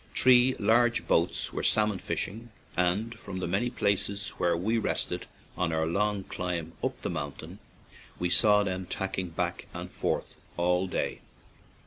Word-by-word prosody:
Three 130 0 +6
large 115 +3 +3
boats 85 +2 +1
were - - -2
salmon 105 -3 +2
fishing, 115 +7 -4 0.3
and 95 +6 +1
from 95 -2 -7
the 95 - -2
many 95 +8 0
places 100 -2 0
where 85 -1 +2
we 110 +6 +1
rested - - -1 0.3
on 90 -2 0
our 80 0 +1
long 100 +4 0
climb 85 -3 -4
up - - -1
the - - -1
mountain 70 -2 -6 0.6
we 90 - 0
saw 105 -2 +5
them 95 -2 -3
tacking 95 -1 -2
back 80 - -3
and - - -6
forth - - -2 0.2
all 90 +2 +2
day. - - -2
95 Hz, 150 wpm, -29 LUFS, 90-105 Hz, 0.6 s, Three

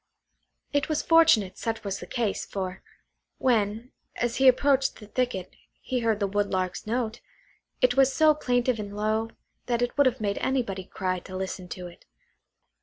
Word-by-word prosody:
It 285 +2 +1
was 310 -1 0
fortunate 320 - +4
such 225 -1 -3
was 200 -2 -3
the - - -9
case, 230 -5 -1
for 190 -1 -5 0.6
when, 225 -1 0 0.2
as 240 +1 -1
he 265 - +5
approached 270 +1 +4
the 210 - -12
thicket, 215 -4 -2 0.2
he 255 - -2
heard 225 -3 +1
the 200 - +1
Woodlark's 195 -1 -1
note, 230 -1 -2 0.6
it 250 0 +4
was 270 -1 +5
so 310 +2 +5
plaintive 245 -4 0
and 205 -1 -6
low, 215 +1 0 0.4
that 240 -1 +1
it 245 - -2
would 285 - +6
have 255 0 0
made 200 -2 -1
anybody 230 -8 -1
cry 185 -1 -2
to 185 +1 -8
listen 190 -1 -4
to 180 0 -7
it. 175 -1 -13
225 Hz, 170 wpm, -27 LUFS, 200-255 Hz, 0.6 s, would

